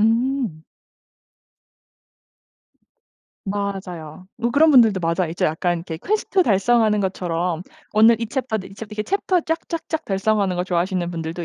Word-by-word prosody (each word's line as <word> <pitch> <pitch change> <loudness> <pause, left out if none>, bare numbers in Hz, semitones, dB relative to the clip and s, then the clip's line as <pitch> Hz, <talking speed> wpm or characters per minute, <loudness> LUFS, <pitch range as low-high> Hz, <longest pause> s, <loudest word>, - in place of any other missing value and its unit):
음. 230 - +1 2.8
맞아요. 185 -5 -5
뭐 235 - -1
그런 305 +5 +5
분들도 225 -7 +6
맞아요. 170 0 0
이제 170 - -2
약간 170 +2 0
이게 165 -1 -6
퀘스트 395 -2 +1
달성하는 215 - +3
것처럼 180 -3 -2 0.3
오늘 225 +2 +6
이 230 - -1
챕터 255 -3 -2
네, 190 - -8
이 195 - -14
챕 215 +1 -8
이렇게 210 0 -3
챕터 380 -2 +1
쫙쫙쫙 325 0 -3
달성하는 195 -1 0
거 180 - -1
좋아하시는 180 0 -1
분들도 165 0 -5
200 Hz, 305 characters per minute, -21 LUFS, 175-235 Hz, 2.8 s, 분들도